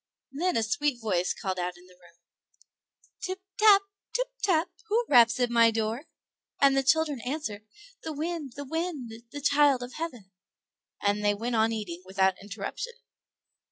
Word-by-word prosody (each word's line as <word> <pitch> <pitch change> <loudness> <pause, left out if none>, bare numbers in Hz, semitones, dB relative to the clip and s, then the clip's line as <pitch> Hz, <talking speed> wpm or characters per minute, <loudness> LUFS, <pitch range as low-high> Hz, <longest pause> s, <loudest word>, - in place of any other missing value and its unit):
Then 345 +4 0
a 225 - +2
sweet 245 +4 0
voice 185 -6 0
called 185 -1 -3
out 175 0 -3
in 180 - -17
the 180 - -19
room, 175 -2 -21 1.0
"Tip 375 +1 -4 0.2
tap, 415 -2 +7 0.3
tip - - 0
tap, 355 -6 +2 0.2
who 455 +3 +1
raps 235 -2 +6
at 245 -1 +1
my 230 -1 +6
door?" 225 +5 -2 0.5
and 275 -1 +5
the 270 - +4
children 295 -1 +2
answered, 235 -7 -4 0.3
"The 320 - -5
wind, 310 -3 -4
the 285 0 -6
wind, 320 -5 -3 0.2
the 290 - -6
child 285 -2 +4
of 245 - -8
heaven"; 245 - -6 0.7
and 205 +1 +1
they 205 0 +3
went 235 +4 -3
on 220 0 +3
eating 195 -6 -4
without 190 0 +2
interruption. 205 - -5
245 Hz, 160 wpm, -28 LUFS, 210-310 Hz, 1.0 s, tap